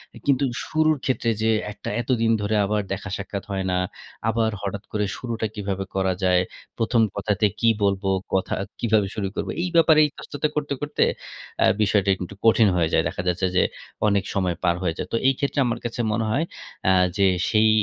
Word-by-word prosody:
এ - - -10
কিন্তু 140 -1 +3 0.2
শুরুর 155 -1 +2
ক্ষেত্রে 125 -3 0
যেয়ে 110 0 +3
একটা 105 - -7
এতদিন 115 -2 +1
ধরে 105 +1 0
আবার 105 +1 0
দেখা 100 +1 -5
সাক্ষাৎ 100 0 -5
হয় 95 -1 -2
না, 90 - +1 0.5
আবার 115 0 +1
হঠাৎ 100 0 -4
করে 105 -1 0
শুরুটা 115 -3 -3
কীভাবে 100 -2 -3
করা 95 -1 +1
যায়? 90 -1 +4 0.4
প্রথম 115 +1 +2
কথাতে 100 -1 0
কী 115 - +4
বলবো, 100 0 +1 0.2
কথা 95 - 0 0.3
কিভাবে 110 -3 +2
শুরু 105 -3 -1
করবো? - - -2
এই 180 - -1
ব্যাপারে 160 -1 +6
ইতস্ততা 145 +1 -3
করতে 150 -1 -1
করতে 145 0 +1 0.6
অ্যা - - +5
বিষয়টা 100 -2 +2
একটু 95 +2 -7
কঠিন 115 -1 +6
হয়ে 85 -2 +2
যায়। - - +4
দেখা - - -3
যাচ্ছে 90 +1 +1
যে - - +5 0.4
অনেক 100 -1 +2
সময় 90 -3 0
পার 85 -1 +3
হয়ে 85 -3 0
যায়। - - -4
তো - - +3
এই 135 - +5
ক্ষেত্রে 140 +1 -1
আমার 115 - -2
কাছে 120 +1 -4
মনে 110 +1 0
হয় 135 +8 +1 0.4
অ্যা 95 - +5 0.2
যে 100 -1 +4 0.2
সেই 110 0 +4
105 Hz, 190 wpm, -24 LUFS, 95-115 Hz, 0.6 s, ব্যাপারে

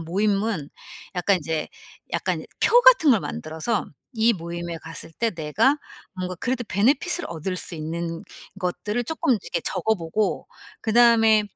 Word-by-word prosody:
모임은 195 -1 0 0.5
약간 190 +2 +3
인제 160 -2 -2 0.5
약간 - - -1 0.2
표 485 - +6
같은 - - +7
걸 230 - +5
만들어서 160 +7 -3 0.3
이 225 +1 +4
모임에 170 -2 -5
갔을 165 0 -8
때 230 +6 -1
내가 190 - +2 0.4
뭔가 185 -1 -4
그래도 250 +4 -1
베네핏을 280 - +2
얻을 170 +3 -4
수 180 - -5
있는 165 +1 -4 0.4
것들을 210 +6 -2
쪼끔 265 +1 0
이렇게 185 -6 -2
적어 220 0 0
보고 175 +5 -1 0.3
그다음에 225 -2 +5
200 Hz, 290 characters per minute, -24 LUFS, 165-230 Hz, 0.5 s, 같은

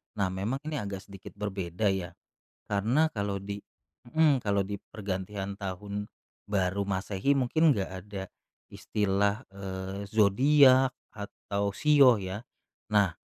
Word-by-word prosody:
Nah, 100 -2 +1
memang 100 +7 -2
ini 150 -2 -3
agak 100 -2 -5
sedikit 100 -1 -12
berbeda 100 -1 -1
ya. 90 -3 -4 0.5
Karena 115 +10 +2
kalau 100 -4 -2
di 100 +1 -5 0.6
mhm, 150 -4 +4
kalau 100 -1 +2
di 105 - -3 0.2
pergantian 100 -1 -4
Tahun 100 +1 -5 0.4
Baru 100 -1 0
Masehi, 100 +5 -1
mungkin 140 +4 +3
nggak 100 -8 -1
ada 100 -2 -6 0.4
istilah, 100 +3 -1
eee, 95 0 -6
zodiak 130 +5 +5 0.2
atau 100 0 -3
shio 135 -1 +5
ya? 95 +4 -5 0.5
Nah, 100 -5 +3
100 Hz, 120 wpm, -29 LUFS, 95-115 Hz, 0.6 s, zodiak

